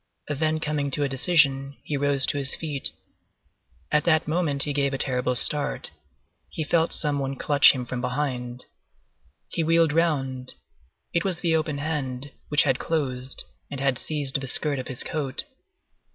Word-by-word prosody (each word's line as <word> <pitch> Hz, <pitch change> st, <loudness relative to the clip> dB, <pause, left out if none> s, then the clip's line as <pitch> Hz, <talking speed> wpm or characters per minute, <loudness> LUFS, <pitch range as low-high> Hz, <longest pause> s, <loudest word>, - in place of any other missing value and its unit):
Then 155 Hz, +2 st, 0 dB
coming 150 Hz, -2 st, -1 dB
to 145 Hz, +2 st, -1 dB
a -, -, +1 dB
decision, 140 Hz, -1 st, +2 dB
he 150 Hz, -, -3 dB
rose 140 Hz, -1 st, +3 dB
to 145 Hz, -, -1 dB
his 135 Hz, -2 st, +2 dB
feet. 150 Hz, -4 st, -1 dB, 1.0 s
At 150 Hz, -, +3 dB
that 160 Hz, -2 st, +3 dB
moment, 155 Hz, -4 st, +3 dB
he 145 Hz, -, -1 dB
gave 140 Hz, -1 st, 0 dB
a -, -, -2 dB
terrible 125 Hz, -1 st, +1 dB
start. 145 Hz, +6 st, -1 dB, 0.6 s
He 160 Hz, -, -4 dB
felt 165 Hz, +2 st, +1 dB
some 145 Hz, -2 st, 0 dB
one 135 Hz, 0 st, -3 dB
clutch 145 Hz, +1 st, +6 dB
him 125 Hz, -2 st, -4 dB
from 125 Hz, 0 st, -4 dB
behind. 125 Hz, -2 st, -3 dB, 0.8 s
He 165 Hz, -, -1 dB
wheeled 165 Hz, -1 st, +3 dB
round; 135 Hz, -6 st, 0 dB, 0.6 s
it 170 Hz, -, +1 dB
was 180 Hz, -3 st, 0 dB
the 165 Hz, -2 st, +2 dB
open 155 Hz, -2 st, -1 dB
hand, 140 Hz, -3 st, -3 dB, 0.2 s
which 150 Hz, 0 st, +4 dB
had 135 Hz, -3 st, +1 dB
closed, 130 Hz, -5 st, -2 dB, 0.3 s
and 140 Hz, -, -5 dB
had 135 Hz, -2 st, +1 dB
seized 140 Hz, -3 st, +1 dB
the 135 Hz, -, -5 dB
skirt 145 Hz, +2 st, +3 dB
of 130 Hz, -, -6 dB
his 130 Hz, -, -1 dB
coat. 140 Hz, -4 st, -3 dB
145 Hz, 165 wpm, -25 LUFS, 135-155 Hz, 1.0 s, clutch